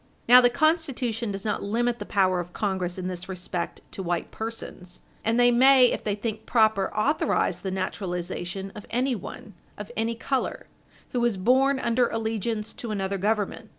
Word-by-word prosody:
Now 250 +1 +9
the 245 - +5
Constitution 250 -6 0
does 195 0 -5
not 210 - -1
limit 235 +3 0
the - - -6
power 185 -2 +2
of 175 0 -6
Congress 190 -3 -2
in 185 - -4
this 185 0 -6
respect 180 -2 -4
to - - -6
white 175 -2 -2
persons. 220 -5 -7 0.2
And 225 +2 +1
they 245 0 +6
may, 255 +1 +6
if - - -3
they 205 -2 -1
think 220 +1 -5
proper, 220 -4 +3
authorize 285 +9 +1
the 190 - -3
naturalization 185 0 -4
of 210 - -10
anyone, 240 -4 -3 0.2
of 210 0 -7
any 225 +1 -1
color, 260 +3 -2 0.5
who 250 - 0
was 235 -4 +1
born 260 +7 +3
under 240 0 +2
allegiance 220 -1 -2
to 235 - -7
another 195 -2 -2
Government. 215 +2 -1
220 Hz, 170 wpm, -26 LUFS, 190-240 Hz, 0.5 s, Now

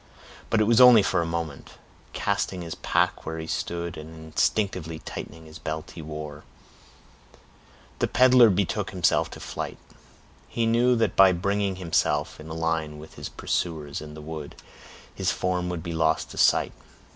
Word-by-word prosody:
But 110 - +2
it - - +5
was 115 +3 +4
only 125 -4 +9
for 90 - +1
a 85 - -2
moment. 80 -4 -5 0.4
Casting 90 -2 -1
his 85 - -5
pack - - 0
where 80 0 -5
he 80 - -5
stood, 85 +1 -3
and 80 +1 -9
instinctively 80 0 0
tightening 80 +1 -8
the 80 0 -12
belt 80 0 -5
he 85 - -9
wore, 75 -1 -7 1.6
the - - +2
peddler 125 -2 +6
betook 95 -1 0
himself - - +1
to - - -10
flight. - - -5 0.7
He 115 - -1
knew 120 +2 +3
that 110 -5 +1
by 95 -1 +7
bringing 100 +2 0
himself 90 -3 0
in 75 +1 -10
a 80 - -5
line 80 -2 -1
with 75 +1 -12
his - - -7
pursuers 75 -5 -3
and 75 0 -9
the - - -8
wood, 75 -1 -7 0.6
his - - 0
form 90 -1 -1
would 85 -3 -4
be 85 -1 -4
lost 80 -1 +1
to - - -10
sight. - - +3
85 Hz, 170 wpm, -26 LUFS, 80-100 Hz, 1.6 s, only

